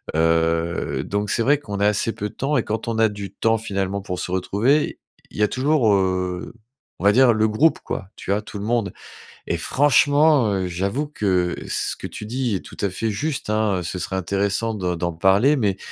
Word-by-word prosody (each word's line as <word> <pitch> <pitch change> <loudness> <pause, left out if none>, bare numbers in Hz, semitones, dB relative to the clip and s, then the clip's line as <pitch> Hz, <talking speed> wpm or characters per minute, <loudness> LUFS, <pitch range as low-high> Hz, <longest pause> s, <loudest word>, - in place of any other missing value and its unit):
Heu, 80 -3 +1
donc 105 +3 -2
c'est 115 - +1
vrai 145 +3 +3
qu'on 100 -7 -6
a 100 - +2
assez 105 +2 0
peu 105 +1 -4
de - - -18
temps 140 +1 0
et 115 - +1
quand 110 +2 -4
on 115 -1 -1
a 110 0 +5
du 100 -1 -7
temps 115 -1 +1
finalement 100 -2 -2
pour 90 -2 -5
se 90 - -4
retrouver, 110 +11 +1 0.3
il - - -13
y 105 - +2
a - - +4
toujours, 130 -4 +2
heu, 90 -1 -1 0.5
on - - -8
va 100 - +6
dire 125 0 +5
le 110 0 +2
groupe 150 +10 +3
quoi, 95 - -5
tu - - -5
vois 105 +1 +1
tout 105 -1 -9
le 100 - -5
monde, 115 -2 0 0.5
et 85 - -1
franchement, 145 - +3
heu, 95 -2 -1
j'avoue 100 - -2
que 90 -9 0
ce - - -1
que - - -7
tu 105 - -8
dis 120 -2 -1
est 95 - -1
tout - - -13
à 100 - 0
fait 110 +4 -2
juste 140 +4 -3
hein, 110 -3 +1
heu, - - -3
ce 90 +2 -4
serait 95 - -3
intéressant 100 +4 -1
de 90 -3 -2
d'en 85 0 -2
parler, 100 - +4
mais 100 -6 0
105 Hz, 220 wpm, -22 LUFS, 95-115 Hz, 0.5 s, va